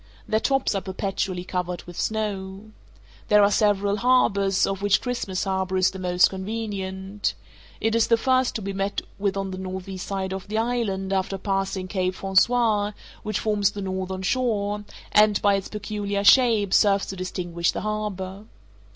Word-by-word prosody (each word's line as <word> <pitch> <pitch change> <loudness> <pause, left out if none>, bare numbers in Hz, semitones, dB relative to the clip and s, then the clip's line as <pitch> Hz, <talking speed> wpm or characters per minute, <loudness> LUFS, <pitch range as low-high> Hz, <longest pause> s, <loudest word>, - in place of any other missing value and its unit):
Their 220 - +2
tops 270 +1 +1
are 195 - -1
perpetually 190 -1 -3
covered 180 -1 -3
with 175 - -11
snow. 205 -1 -3 0.6
There 210 -1 +6
are 200 - +4
several 205 -1 +2
harbors, 200 -5 +3
of 195 0 -3
which 205 0 +3
Christmas 235 -7 -3
Harbour 190 -1 -1
is 185 0 +3
the 190 - -8
most 180 0 +3
convenient. 195 -1 -4 0.4
It 225 - 0
is 230 -1 +3
the 230 - +4
first 255 +1 +2
to 215 - -3
be 200 0 -3
met 195 +1 -2 0.2
with 200 -1 0
on 195 -1 -3
the 185 - -6
northeast 190 0 -6
side 190 -1 -3
of 190 0 -6
the 215 +1 -2
island 220 -5 -1
after 190 0 -1
passing 195 -1 -2
Cape 185 -1 -1
Francois, 210 +2 +2 0.3
which 215 -1 -2
forms 210 -2 +1
the 205 - -7
northern 190 0 -3
shore, 210 -3 0 0.3
and, 210 -1 +5
by 205 -1 +5
its 195 -1 -1
peculiar 205 -1 -3
shape, 220 -3 +5
serves 200 -2 +4
to 195 - -6
distinguish 175 -2 -2
the - - -4
harbour. 210 -2 -4
195 Hz, 170 wpm, -24 LUFS, 190-210 Hz, 0.6 s, There